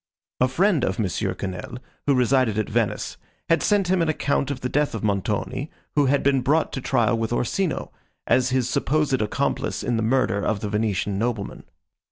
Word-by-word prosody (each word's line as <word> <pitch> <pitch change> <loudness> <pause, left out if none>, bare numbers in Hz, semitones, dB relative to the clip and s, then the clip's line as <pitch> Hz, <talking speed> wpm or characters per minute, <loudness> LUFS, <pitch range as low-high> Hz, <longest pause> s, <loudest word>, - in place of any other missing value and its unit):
A 130 - +4
friend 165 +2 +2
of 95 - 0
Monsieur 100 -6 -1
Quesnel, 95 +5 -5 0.3
who 140 - +4
resided 125 -3 +2
at 110 - 0
Venice, - - -1 0.3
had 165 - +4
sent 205 -3 +2
him 185 -1 +2
an 165 - +1
account 140 -2 0
of 140 -2 -4
the 125 - -1
death 145 -1 0
of 110 - -5
Montoni 105 - -1 0.2
who 145 -2 +3
had 140 +2 +2
been 135 -1 +3
brought 150 +5 +1
to 135 - -3
trial 115 -4 +2
with 115 0 -2
Orsino, 155 - -1 0.3
as 130 0 +3
his 130 -2 +1
supposed 135 +1 +1
accomplice 105 - -1
in 120 -2 0
the - - 0
murder 110 -4 +1
of 105 -2 0
the 105 - -3
Venetian 100 -2 -1
nobleman. 115 -3 -3
125 Hz, 190 wpm, -24 LUFS, 110-140 Hz, 0.3 s, A